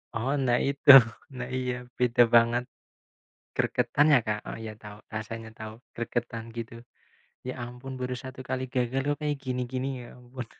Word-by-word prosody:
Oh, 120 +4 -1
nah 120 -1 +3
itu. 140 +1 -1 0.5
Nah, 125 -1 -4
iya. 125 -1 -1 0.2
Beda 125 0 +4
banget. 120 +1 +5 0.9
Gregetan 145 +1 +2
ya, - - +7
Kak? 105 0 0
Oh - - -5
ya 110 - -5
tahu, 105 -1 -9 0.2
rasanya 110 +1 -5
tahu, 110 -1 -7 0.2
gregetan 115 -1 -3
gitu. 115 0 -6 0.7
Ya 130 - -3
ampun 125 +2 -8
baru 125 0 -2
1 130 0 -9
kali 130 0 -1
gagal 125 +1 0
kok 145 0 +1
kayak 150 -1 -1
gini-gini, 130 +1 -2
ya - - -10
ampun. 125 0 -8
125 Hz, 160 wpm, -28 LUFS, 115-130 Hz, 0.9 s, ya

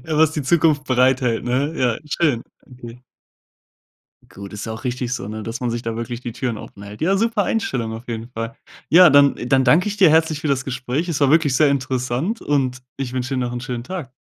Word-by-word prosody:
Ja 155 -1 -1
was 160 0 +4
die 150 - -3
Zukunft 150 0 +2
bereithält, 130 -2 +2
ne? 130 +5 0
Ja, 120 -5 +1
schön. 150 -7 +1 0.3
Okay. 125 -1 -12 1.3
Gut, 100 +1 -10
ist 105 - -6
ja 110 - -4
auch 110 +4 -9
richtig 125 -1 -3
so, 100 -5 -4
ne? 110 0 -6
Dass 115 +2 -5
man 125 - -1
sich 120 0 -3
da 115 -1 -4
wirklich 115 +1 -5
die 120 - -5
Türen 120 -1 -3
offenhält. 100 +2 -10
Ja, 190 +4 +2
super 225 0 +1
Einstellung 125 - -2
auf 115 +2 -9
jeden 115 0 -5
Fall. 115 -1 -5 0.3
Ja, 175 +1 +8
dann 140 0 +6
dann 130 +1 +3
danke 160 +9 +4
ich 205 0 -5
dir 185 - +7
herzlich 160 -1 +2
für 155 - -2
das 135 -2 0
Gespräch. 130 +5 -3
Es 150 - -2
war 140 -2 +4
wirklich 155 -3 +3
sehr 155 0 +4
interessant 130 - -1
und 130 -3 0 0.2
ich 130 -2 -4
wünsche 130 +1 -3
dir 130 - -1
noch 120 -1 -2
'n 120 - -4
schönen 120 -2 -5
Tag. 170 -4 -6
130 Hz, 225 wpm, -21 LUFS, 120-150 Hz, 1.3 s, Ja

